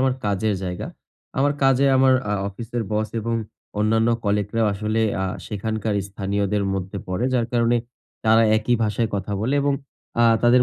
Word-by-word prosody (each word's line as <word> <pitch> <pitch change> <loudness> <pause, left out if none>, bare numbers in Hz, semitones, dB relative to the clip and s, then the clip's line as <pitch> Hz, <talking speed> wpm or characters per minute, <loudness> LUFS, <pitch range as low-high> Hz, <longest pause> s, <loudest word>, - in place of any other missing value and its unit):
আমার 130 -1 +2
কাজের 105 +1 +1
জায়গা। 90 -1 -4 0.5
আমার 140 +1 +3
কাজে, 135 0 +4
আমার 130 0 +5 0.2
আ - - +1 0.2
অফিসের 115 +4 -4
বস 110 +1 0
এবং 115 +2 -2 0.4
অন্যান্য 110 +2 +2 0.2
colleague 100 0 0
রাও 115 -1 +3
আসলে 110 +2 -1 0.2
আ - - +1 0.2
সেখানকার 110 0 -2
স্থানীয়দের 100 +1 -1
মধ্যে 95 +1 -4
পড়ে। 90 +7 -1
যার 120 -2 +2
কারণে 120 0 +3 0.5
তারা 110 +1 +5
একই 115 +3 +1
ভাষায় 110 +2 0
কথা 100 +1 -3
বলে 125 +6 0
এবং 140 -1 +2 0.5
আ - - +6 0.2
তাদের 125 +1 +6
110 Hz, 165 wpm, -23 LUFS, 100-120 Hz, 0.5 s, আ